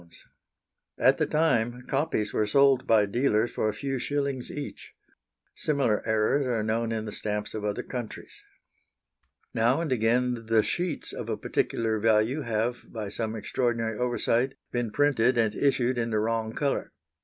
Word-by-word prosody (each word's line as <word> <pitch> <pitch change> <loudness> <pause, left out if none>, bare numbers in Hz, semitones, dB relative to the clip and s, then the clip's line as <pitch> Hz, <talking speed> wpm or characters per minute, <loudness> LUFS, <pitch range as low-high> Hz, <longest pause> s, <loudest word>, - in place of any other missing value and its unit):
At - - +4
the - - +2
time, 125 -6 +1
copies 135 -7 -1
were 105 - +1
sold 135 +3 +4
by 110 -2 +5
dealers 115 +1 +1
for 110 - 0
a - - -2
few 135 +2 -3
shillings 140 -2 -2
each. 145 -1 -7 0.6
Similar 140 -8 +1
errors 110 +6 +2
are 115 -3 0
known 115 +1 0
in 110 -1 -2
the 105 - -5
stamps 105 0 -3
of 110 - -4
other 105 -1 -2
countries. 120 -4 -7 1.1
Now 120 +5 +2
and 165 -4 -2
again 120 0 +1
the 110 -1 +4
sheets 175 -3 -3
of - - -6
a - - -1
particular 110 -1 -1
value 110 +6 +2
have, 115 0 -1
by 110 -3 -5
some 110 +1 -3
extraordinary 115 0 -1
oversight, 125 +2 +1 0.2
been 120 -2 -1
printed 125 -1 +2
and 110 -2 +2
issued 130 -3 +1
in 115 0 -1
the 110 - 0
wrong 110 +1 -1
colour. 140 -2 -1
115 Hz, 155 wpm, -27 LUFS, 110-130 Hz, 1.1 s, by